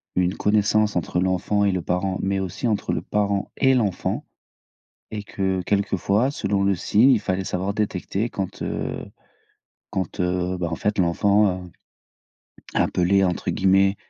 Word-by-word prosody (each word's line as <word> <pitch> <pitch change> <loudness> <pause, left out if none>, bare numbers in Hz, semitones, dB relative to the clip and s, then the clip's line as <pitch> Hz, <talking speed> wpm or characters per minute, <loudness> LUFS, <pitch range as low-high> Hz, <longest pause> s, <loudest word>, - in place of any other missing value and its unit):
une 90 +1 +1
connaissance 105 0 +2
entre 90 0 -1
l'enfant 95 +3 +1
et 100 - +3
le 90 -1 -1
parent, 90 +2 -1
mais 95 0 0
aussi 95 +5 -3
entre 110 -3 0
le - - -1
parent 100 -1 -1
et 135 0 +4
l'enfant 110 -7 0 0.9
et 105 -1 -4
que 95 -2 -1
quelquefois, 100 +4 +1
selon 100 -8 -1
le 100 0 +3
signe 105 +8 +4
il 120 - +4
fallait 95 +1 -2
savoir 95 +2 -2
détecter 100 +1 -2
quand, 95 -4 -5
heu - - -3 0.9
quand, 95 -2 -3
heu, 90 0 0
bah 85 -1 -1
en 80 - -2
fait 105 +4 -1
l'enfant, 95 +1 +2
heu, 90 - -12 1.0
appelait 95 +2 +2
entre 90 -2 -1
guillemets 95 +1 +3
95 Hz, 155 wpm, -23 LUFS, 90-105 Hz, 1.0 s, et